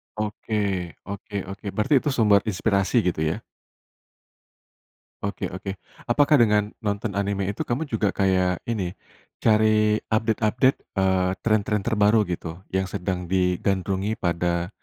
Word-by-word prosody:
Oke, 105 -4 -2
oke 100 +1 -8
oke. 100 +2 -9
Berarti 110 +7 +1
itu 150 - -2
sumber 105 -3 +5
inspirasi, 100 +1 0
gitu 80 -3 0
ya? 80 0 0 1.9
Oke - - -3
oke. 95 +1 -6 0.4
Apakah 145 +3 +5
dengan 105 -2 +3 0.2
nonton 100 0 -2
anime 100 -1 -1
itu 100 - -4
kamu 125 +6 0
juga 105 -2 +2
kayak 95 -2 +1
ini, 110 -5 -1 0.6
cari 110 -1 +5 0.5
update-update, 110 +3 +2 0.2
eee, 95 -1 +2
tren-tren 105 -2 +1
terbaru 110 -1 +3
gitu 85 - -4 0.3
yang 95 0 +1
sedang 90 -1 -2
digandrungi 95 +2 0
pada, 85 0 0
100 Hz, 120 wpm, -24 LUFS, 95-110 Hz, 1.9 s, sumber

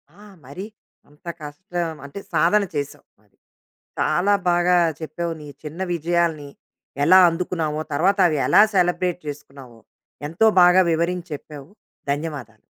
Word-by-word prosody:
ఆ! 205 - -21 0.3
మరి 145 +9 -8 0.4
అంత 150 +3 -21
కష్టం, 165 +2 -5
అంటే 140 +8 -8
సాధన 200 +5 +3
చేసావు 145 -1 -5 0.2
మరి. - - -34 0.6
చాలా 200 +3 +2 0.2
బాగా 175 +1 +3 0.2
చెప్పావు. 165 +2 -4
నీ 150 - -10 0.2
చిన్న 160 +4 -7
విజయాల్ని 165 -3 -1 0.5
ఎలా 185 +5 +7
అందుకున్నావో 165 -3 -3
తర్వాత 190 +7 +2
అవి 155 -3 -1
ఎలా - - +6
సెలబ్రేట్ 180 -1 +1
చేసుకున్నావో. 135 -5 -10 0.5
ఎంతో 165 +8 +2
బాగా 180 +1 +6
వివరించి 170 +2 -1
చెప్పావు. 145 +1 -10 0.4
ధన్యవాదాలు. 140 -8 -5
165 Hz, 120 wpm, -22 LUFS, 150-180 Hz, 0.6 s, ఎలా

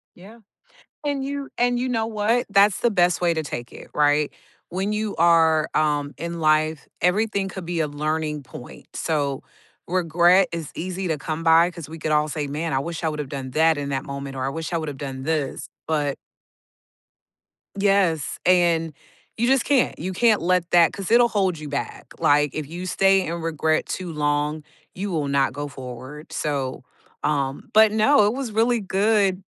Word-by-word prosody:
Yeah, 210 +6 -14 0.7
and 280 -2 -1
you 280 0 -4
and 245 0 +2
you 255 +1 -1
know 225 -2 0
what? 225 +3 0
That's 200 0 +4
the 240 - +2
best 180 -2 +2
way 170 -1 +3
to 160 -1 -2
take 120 -4 -6
it, - - -12
right? 150 0 +2 0.4
When 190 +4 -2
you 215 -1 -2
are, 160 -2 +4
um, 145 -2 0
in 170 0 -5
life, 155 -1 +1
everything 200 +2 +1
could 190 -3 -7
be 170 -1 -1
a 155 - 0
learning 150 0 -2
point, 125 -1 -12
so, 145 -4 -2 0.4
regret 175 +1 +3
is 165 -4 -5
easy 185 +2 -4
to 155 - 0
come 155 +3 -4
by 165 +1 +5
'cause 170 -4 -9
we 160 0 -9
could 155 - -2
all 150 0 +2
say, 150 -1 -3
"Man, 155 +3 -3
I 135 - +2
wish 165 +4 -5
I 160 - +1
would've 150 -2 -4
done 135 -2 -6
that 160 +2 +3
in 140 -1 -3
that 135 -1 -2
moment, 140 -1 -6
or 130 - -2
I - - 0
wish 160 +3 -5
I 170 - 0
would've 150 -4 -5
done 135 -1 -6
this," 150 -3 -2 0.2
but 150 -3 0 1.6
Yes, 195 -6 +1
and 170 -3 +3 0.4
you 235 +2 +1
just 265 -1 +3
can't; 275 -4 +2
you 185 +3 -4
can't 220 -1 +3
let 180 0 +1
that 170 -2 +5
'cause 195 0 -5
it'll 240 +1 +6
hold 190 -7 0
you 150 - -7
back, 140 0 -5
like, 145 0 +3
if 155 -2 -4
you 175 +4 -6
stay 195 +1 +3
in 170 +1 -4
regret 160 -1 0
too 185 -2 -5
long, 150 0 -1 0.3
you 195 +2 -4
will 150 -4 -1
not 140 -2 +1
go 145 +2 -4
forward, 130 +2 -9
so, 135 -4 -3 0.4
um 140 -2 -1
but 220 0 +6
no, 220 +2 +4
it 210 - +1
was 265 -3 -4
really 230 +2 +2
good 195 -1 +1
165 Hz, 185 wpm, -23 LUFS, 150-195 Hz, 1.6 s, it'll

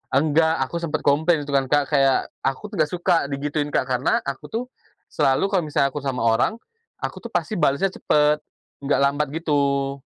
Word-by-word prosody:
Enggak 160 +3 +3
aku 170 +6 -4
sempet 160 -2 -3
komplain 155 +2 +2
gitu 145 - -7
kan, 135 -1 +1
Kak, 145 +1 +1
kayak 135 -2 +2
aku 135 +11 -3
tuh 200 - -6
nggak 155 -1 +2
suka 175 -4 +1
digituin, 145 +1 -2
Kak. 145 - 0
Karena 125 +1 +1
aku 140 -1 -5
tuh 230 +2 -3 0.5
selalu 135 +9 +1
kalo 180 -6 +1
misalnya 140 -2 +1
aku 145 - -4
sama 135 -4 -3
orang, 115 - +2 0.5
aku - - -4
tuh - - -18
pasti 175 +3 -1
balesnya 170 +6 +2
cepet, 150 -3 +2 0.4
nggak 140 +1 +1
lambat 145 +2 +1
gitu. 140 -3 0
145 Hz, 185 wpm, -22 LUFS, 140-165 Hz, 0.5 s, Enggak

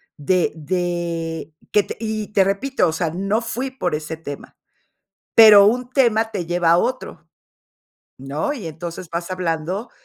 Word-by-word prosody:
de 175 +4 0
de 165 -1 -3 0.2
que 210 - +5
te - - -8
y 215 -2 -3
te 195 -2 +3
repito, 200 +1 0
o 160 - -1
sea, 165 -1 -1
no 195 +5 -1
fui 245 +3 -4
por 180 -12 -2
ese 155 +1 -5
tema. 145 -3 -9 0.8
Pero 210 -3 +9
un 245 +3 0
tema 225 -4 +2
te 175 -5 -4
lleva 175 -1 +1
a 170 - +5
otro, 255 +6 -3 0.9
¿no?, 145 - -3
y 220 -10 -7
entonces 165 +2 -8
vas 170 +2 -4
hablando 180 +4 -3
180 Hz, 155 wpm, -21 LUFS, 165-220 Hz, 0.9 s, Pero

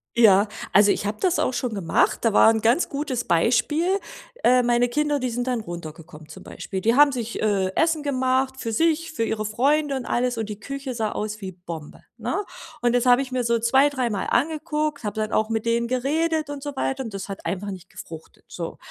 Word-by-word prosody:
Ja. 210 -3 +6 0.3
Also, 205 0 +6
ich - - -2
habe 205 +1 -2
das 365 -2 +1
auch - - +1
schon 250 -2 -2
gemacht, 190 -5 +1
das 230 -2 +2
war 220 - +7
'n 220 - -1
ganz 235 +10 +3
gutes 275 -4 -3
Beispiel. 295 - +2 0.4
Äh, 250 0 +5
meine 240 0 +2
Kinder, 295 +3 0
die 255 -1 -1
sind 245 +2 -3
dann 245 -3 0
runtergekommen, 160 -4 -9
zum 155 - -11
Beispiel. 190 -1 -6
Die 230 +4 +2
haben 290 +1 +6
sich, 235 -2 -4
äh, 195 -3 +1
Essen 320 -2 +2
gemacht 260 -1 0
für 230 -4 -4
sich, 330 +5 +1
für 230 - -1
ihre 220 -1 -2
Freunde 280 +7 +1
und 260 -2 -4
alles 245 0 0
und 220 -1 -3
die 210 -1 -6
Küche 275 +3 -5
sah 220 -3 -2
aus 215 0 -4
wie 190 -1 -6
Bombe, 170 -4 -9 0.2
ne? 415 - -2 0.4
Und 240 0 +2
das 245 0 +2
habe 245 +1 +6
ich 260 - -10
mir 255 -1 0
so 235 0 +2
zwei, 265 +5 +4
dreimal 240 -8 -2
angeguckt, 305 +1 -1
habe 210 - -3
dann 215 - -3
auch 215 0 +1
mit 225 0 -2
denen 235 0 +1
geredet 305 +5 0
und 285 -1 -6
so 290 0 -6
weiter 265 0 -2
und 225 -4 -7
das 195 - -5
hat 195 - -7
einfach 195 +4 -3
nicht 185 -1 -10
gefruchtet, 160 -1 -11
so. - - -6
240 Hz, 220 wpm, -24 LUFS, 210-275 Hz, 0.4 s, war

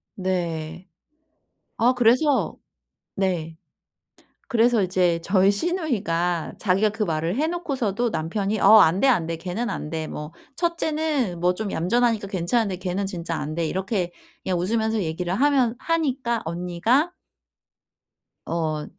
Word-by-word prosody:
네. 175 -3 -3 0.9
아 245 +3 +4
그래서 255 +4 +3 0.6
네 170 -4 -2 0.9
그래서 235 -3 +3
이제 180 -2 +1
저희 190 +2 +4
시누이가 200 - -1
자기가 195 +1 +2
그 215 +1 -2
말을 165 +1 -1
해 300 +4 +1
놓고서도 255 - -1
남편이 195 +5 -2
"어 220 - +8
안 165 +1 +4
돼, - - +4
안 215 -11 +3
돼' 165 0 -3
걔는 185 +8 -3
안 150 - -5
돼. 160 -1 -3
뭐 150 +1 -7 0.2
첫째는 310 - -1
뭐 180 +1 +2
좀 210 +1 -4
얌전하니까 225 +5 +1
괜찮은데 195 +2 0
걔는 185 +2 -2
진짜 175 -3 -4
안 150 +1 -4
돼." 165 0 -1
이렇게 190 +1 -2 0.3
그냥 185 -2 -1
웃으면서 220 +3 0
얘기를 175 +2 -3
하면 260 -1 +2
하니까 265 -6 -1
언니가 180 - 0 1.3
어 155 -2 -2
195 Hz, 260 characters per minute, -24 LUFS, 170-240 Hz, 1.3 s, 어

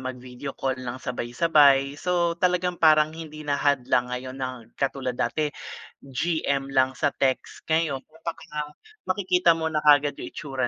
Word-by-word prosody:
mag-video 130 +1 -7
call 130 -1 -2
nang 125 -1 -5
sabay-sabay. 140 +2 +2
So 175 -2 +1
talagang 180 -1 +1
parang 155 -1 +5
hindi 155 -1 -9
na 145 -1 -1
hadlang 130 -3 +2
ngayon 130 +1 -5
na 130 -3 -5
katulad 135 -2 -2
dati 150 -2 0 0.5
GM 140 -1 -1
lang 130 -1 +2
sa 130 - 0
text. 130 -1 -1
Ngayon 160 -4 0
kumbaga 155 -2 -6 0.4
makikita 180 -3 +3
mo 160 -1 -2
na 155 - +1
kaagad 145 -1 +4
yung - - -6
itsura 130 +4 -3
145 Hz, 145 wpm, -25 LUFS, 130-160 Hz, 0.5 s, parang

